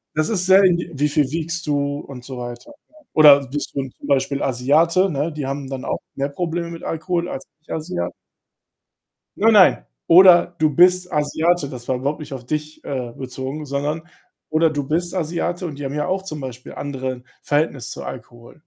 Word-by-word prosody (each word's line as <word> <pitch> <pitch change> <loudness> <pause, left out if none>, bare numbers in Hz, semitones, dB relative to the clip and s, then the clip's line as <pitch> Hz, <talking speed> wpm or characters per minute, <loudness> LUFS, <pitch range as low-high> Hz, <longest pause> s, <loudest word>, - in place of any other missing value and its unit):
das 155 0 +1
ist 190 -5 0
sehr 190 +1 +6
indivi 175 -2 +2
wie 150 +1 +2
viel 145 -2 +1
wiegst 165 +1 -2
du 145 -1 0
und 130 -4 -10
so 130 -1 -7
weiter, 120 - -8 0.2
ja? - - -27 0.2
Oder 145 -3 +7
bist 145 +3 -4
du 135 -1 -2
zum - - -10
Beispiel 140 0 +1
Asiate, 155 +9 +3
ne? 150 +2 -1
Die 150 -3 -4
haben 135 0 -4
dann 135 -1 -5
auch - - -2 0.2
mehr 140 +1 -1
Probleme 170 +2 -3
mit 165 - -9
Alkohol 170 +1 -2
als 135 - -5 0.2
Nicht-Asia 90 - -4 1.3
Nein, 225 +2 +4
nein! 190 -4 +6 0.2
„Oder 175 0 +7
du 155 - +4
bist 180 +3 +4
Asiate.“ 155 +1 +1
Das 125 -3 -9
war 130 - +1
überhaupt 140 +4 -2
nicht 150 -2 -8
auf 130 -2 -8
dich, 150 +3 -4
äh, 125 -4 -4
bezogen, 130 +3 -6
sondern: 145 +3 -2 0.5
„Oder 160 +1 +3
du 145 -2 -2
bist 175 +3 -1
Asiate.“ 175 +1 -2
Und 150 -4 -6
die 145 - -4
haben 135 - -4
ja 150 0 -1
auch 190 +1 -1
zum 155 -6 -6
Beispiel 125 -2 -8
andere 130 -3 -5 0.2
Verhältnis 145 -5 -1
zu - - -6
Alkohol. 120 +3 -10
150 Hz, 190 wpm, -21 LUFS, 135-170 Hz, 1.3 s, Oder